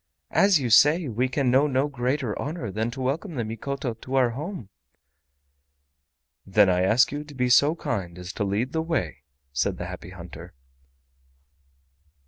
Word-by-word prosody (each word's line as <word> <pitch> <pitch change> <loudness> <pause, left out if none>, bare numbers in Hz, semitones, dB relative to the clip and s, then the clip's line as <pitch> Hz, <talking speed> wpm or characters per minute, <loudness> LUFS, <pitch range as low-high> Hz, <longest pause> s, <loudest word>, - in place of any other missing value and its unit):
"As 195 -4 +4
you 125 -4 -2
say, 150 +8 +5
we 125 +2 -1
can 130 -1 +1
know 135 +4 +4
no 135 0 +1
greater 130 -3 -2
honor 140 - -4
than 110 +4 -2
to 130 +3 -8
welcome 155 +7 -2
the 120 - -1
Mikoto 125 +4 -4
to 130 +4 -6
our 125 -3 +3
home." 150 - -6 1.7
"Then 95 -1 +4
I 90 0 +1
ask 110 +7 +4
you 145 +1 -4
to 150 -1 -13
be 125 -1 0
so 145 +6 +5
kind 95 - -4
as 90 +1 -7
to - - -2
lead 105 +6 -1
the 160 - -1
way," 160 - -2 0.3
said 65 - 0
the - - -5
Happy 85 - -8
Hunter. 85 -8 -11
125 Hz, 165 wpm, -25 LUFS, 105-145 Hz, 1.7 s, say